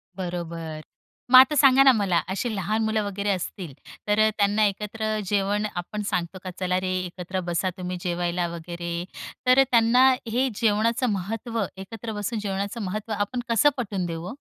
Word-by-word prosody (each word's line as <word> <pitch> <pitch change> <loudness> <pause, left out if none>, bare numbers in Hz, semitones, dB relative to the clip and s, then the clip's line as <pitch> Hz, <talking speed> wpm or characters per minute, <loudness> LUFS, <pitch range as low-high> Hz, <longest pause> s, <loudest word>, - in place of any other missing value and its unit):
बरोबर, 170 -4 -5 0.5
मग 255 - +10
आता 285 +3 +6
सांगा 270 -1 +6
ना, 270 - +8
मला 195 -5 +1 0.2
अशी 240 +4 -2
लहान 215 +4 -1
मुलं 220 -1 0
वगैरे 200 +1 -3
असतील, 180 -4 -3 0.3
तर 210 +1 +2
अ, 215 0 +5
त्यांना 205 +1 +3
एकत्र 215 +2 -2
जेवण 205 +2 0 0.2
आपण 210 +4 -6
सांगतो 180 +1 -2
का 185 - -5
"चला 185 0 0
रे, 185 0 -1
एकत्र 180 +1 -5
बसा 175 +2 0
तुम्ही 180 0 -4
जेवायला" 175 0 -1
वगैरे. 170 0 -6 0.5
तर 255 +1 +6
अ, - - +8
त्यांना 235 +2 +5 0.2
हे 255 +4 +1
जेवणाचं 230 +3 +1
महत्त्व, 225 +4 -3 0.2
एकत्र 220 +3 -7
बसून 210 +2 -3
जेवणाचं 200 +2 -3
महत्त्व, 210 +3 -4
आपण 205 +5 -2
कसं 230 +6 +5
पटवून 200 -6 -2
देऊ 165 -1 -5
ओ? - - -6
205 Hz, 170 wpm, -25 LUFS, 180-225 Hz, 0.5 s, मग